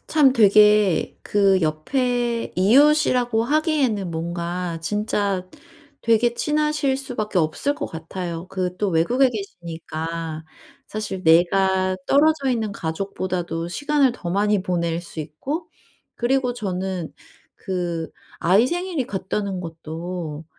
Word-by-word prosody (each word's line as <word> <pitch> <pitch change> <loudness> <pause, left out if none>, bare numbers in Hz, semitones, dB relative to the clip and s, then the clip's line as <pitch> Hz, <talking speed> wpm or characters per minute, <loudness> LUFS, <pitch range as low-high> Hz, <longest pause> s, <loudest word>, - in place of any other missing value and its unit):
참 290 -4 +4
되게 210 -4 +4
그 195 -2 +3
옆에 240 - -1
이웃이라고 245 +1 +4
하기에는 275 - +1
뭔가 170 +1 -3
진짜 200 0 -1 0.5
되게 230 +1 +3
친하실 300 -1 +1
수밖에 230 -8 -2
없을 160 - 0
것 - - -4
같아요. 170 +1 -6
그 185 -1 -3
또 205 - +1
외국에 245 +12 +3
계시니까 165 -5 -6 0.4
사실 210 -3 -5
내가 185 +3 +3
떨어져 285 -1 +3
있는 220 -4 -1
가족보다도 175 -1 -3
시간을 290 - +2
더 175 -8 -6
많이 205 +1 +2
보낼 170 -2 -1
수 175 - -11
있고 275 - -5 0.5
그리고 250 +1 +1
저는 190 -5 -3 0.4
그 175 -3 -3 0.3
아이 195 +8 +4
생일이 350 -6 -2
같다는 195 0 -3
것도 165 -1 -6
195 Hz, 240 characters per minute, -22 LUFS, 170-245 Hz, 0.5 s, 참